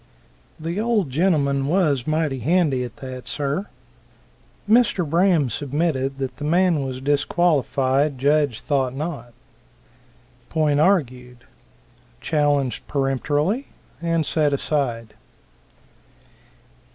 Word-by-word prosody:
"The 165 +5 -3
old 215 - 0
gentleman 140 -4 +1
was 150 -7 +1
mighty 155 -3 0
handy 145 -1 +1
at 120 -2 -7
that, 130 -1 -8
sir." 145 +7 -2 1.0
Mr. 215 -6 +3
Braham 170 -2 +3
submitted 135 0 -1
that 130 -2 -4
the 145 - -7
man 170 -1 +2
was 130 -1 -5
disqualified. 145 -1 +1
Judge 140 -3 +1
thought 135 -3 -1
not. 145 -5 -5 1.2
Point 150 -3 +1
argued. 125 -9 0 0.8
Challenged 145 -2 0
peremptorily, 145 - 0 0.3
and 165 -2 0
set 150 -1 +1
aside. 125 -6 -2
145 Hz, 95 wpm, -22 LUFS, 135-165 Hz, 1.2 s, Mr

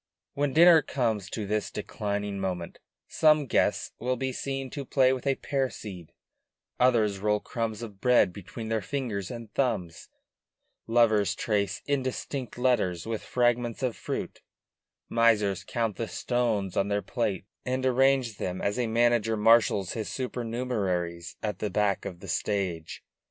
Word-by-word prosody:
When 145 0 0
a - - -8
dinner 170 0 +8
comes 110 -8 -1
to 105 -1 -4
this 105 +1 -1
declining 100 -1 -3
moment 90 -3 -4 0.3
some 155 -2 +4
guests - - +1
will 125 +1 0
be 130 +1 -2
seen 135 0 -4
to 145 - -4
play 130 -1 +3
with 130 +1 -4
a 135 - +3
pear 135 -1 -1
seed; 90 -9 -9 0.7
others 110 -6 +3
roll 105 +1 +1
crumbs 115 0 -4
of 105 -4 -9
bread 125 -7 +4
between 110 +4 -7
their 110 -1 0
fingers 105 -4 -3
and 115 -3 -8
thumbs; 105 -11 -1 0.8
lovers 110 -4 +3
trace 100 -3 -1
indistinct 130 -2 -3
letters 120 -9 +1
with 110 -1 -3
fragments 120 0 0
of 125 -3 0
fruit; - - -5 0.7
misers 110 -5 +2
count 115 -4 -2
the 115 - -2
stones 115 -7 -1
on 100 - +1
their 100 0 0
plate 100 -6 -2 0.2
and 130 0 -1
arrange 130 -3 +3
them 90 0 -3
as 100 +4 -1
a 120 - +1
manager 115 -1 +2
marshals 105 -3 +4
his 110 -2 -4
supernumeraries 110 -9 -2
at 105 -1 -2
the 105 - -1
back 100 0 0
of 90 -3 -7
the - - -9
stage. 95 -6 -2
115 Hz, 150 wpm, -28 LUFS, 100-125 Hz, 0.8 s, dinner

